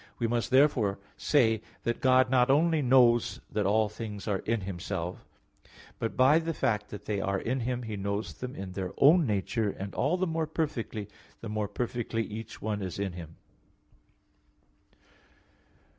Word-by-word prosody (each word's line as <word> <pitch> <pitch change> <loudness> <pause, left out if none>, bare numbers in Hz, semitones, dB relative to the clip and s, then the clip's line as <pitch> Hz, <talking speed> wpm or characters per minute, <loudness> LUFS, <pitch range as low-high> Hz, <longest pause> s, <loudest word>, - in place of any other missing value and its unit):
We 120 - -1
must 115 -2 0
say 130 - +4
therefore 125 -9 +3 0.9
that 120 - -2
God 130 0 +4
not 125 0 +4
only 160 +3 +3
knows 125 -3 +4
that 105 -2 0
all 110 +2 +3
things 105 -1 -7
are 100 -3 0
in 115 +2 -1
Himself; 90 -1 -5 0.7
but 115 - -3
by 135 +5 +6
the 165 -1 -3
fact 105 -2 0
that 105 - -9
they 100 -2 -1
are 100 0 0
in 130 +3 -1
Him, 125 +1 -2
He 110 -2 -5
knows 100 +2 -3
them 125 0 -7
in 95 -1 -6
their 95 0 -4
own 155 +2 +6
nature 105 +1 0
and 100 0 -6
all 165 +6 +1
the 185 - +1
more 160 -2 -1
perfectly, 125 - -3 0.3
the 115 - -6
more 105 -1 -1
perfectly 115 +1 -2
each 110 +1 -8
one 105 -1 -2
is 95 -3 -4
in 100 -2 -2
Him. 80 -2 -9
115 Hz, 165 wpm, -29 LUFS, 100-130 Hz, 0.9 s, by